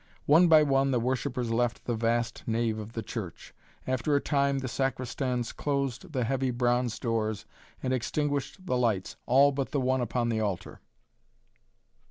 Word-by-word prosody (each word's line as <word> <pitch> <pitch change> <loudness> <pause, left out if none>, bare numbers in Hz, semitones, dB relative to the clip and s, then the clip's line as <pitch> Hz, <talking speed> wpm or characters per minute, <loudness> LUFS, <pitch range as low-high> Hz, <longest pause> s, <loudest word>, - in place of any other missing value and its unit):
One 165 +5 +6
by 155 -2 +7
one 135 -1 +2
the 125 -2 +2
worshippers 125 0 -1
left 120 0 0
the 120 - -1
vast 115 +1 0
nave 115 -1 0
of 110 +1 -8
the 115 - -4
church. 100 -8 -7 0.3
After 130 +3 0
a - - +4
time 140 -1 +1
the 130 -1 -3
sacristans 125 -1 -2
closed 140 +3 -2
the 130 -4 0
heavy 130 +2 0
bronze 120 -1 +1
doors 110 -2 -2 0.4
and 130 - 0
extinguished 145 +7 -2
the 130 -8 0
lights, 110 -6 0
all 140 +3 +6
but 135 -1 -2
the 145 - -1
one 130 0 +1
upon 120 0 -1
the 110 -1 0
altar. 100 -5 -3
125 Hz, 165 wpm, -28 LUFS, 115-135 Hz, 0.4 s, by